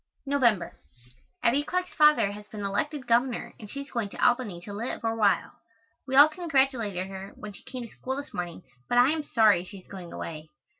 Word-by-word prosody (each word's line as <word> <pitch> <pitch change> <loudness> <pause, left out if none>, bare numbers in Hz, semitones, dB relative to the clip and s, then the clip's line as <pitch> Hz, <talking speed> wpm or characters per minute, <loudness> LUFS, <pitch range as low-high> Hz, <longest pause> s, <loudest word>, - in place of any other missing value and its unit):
November. 245 -9 +1 0.6
Abbie 255 +5 +4
Clark's 365 +3 -2
father 300 -9 +5
has 210 0 -10
been 210 -1 -7
elected 255 +8 -2
Governor 240 +1 +1
and 210 -3 -10
she 280 - -5
is 280 - -11
going 230 -5 -2
to - - -11
Albany 220 -8 +2
to 205 +3 -8
live, 225 +5 -4
for 225 - 0
a - - -3
while. 205 -3 +1 0.5
We 265 - -1
all 285 +2 +10
congratulated 265 - 0
her 190 0 -8
when 210 -1 -9
she - - -14
came 255 -2 -7
to - - -7
school 260 +1 -4
this 285 +1 -7
morning, 175 0 -5 0.3
but 245 - +2
I 250 +3 +6
am 315 0 -1
sorry 215 -10 +4
she 195 +2 -11
is 185 - -15
going 185 -3 -9
away. 155 -1 -7
230 Hz, 210 wpm, -27 LUFS, 200-275 Hz, 0.6 s, all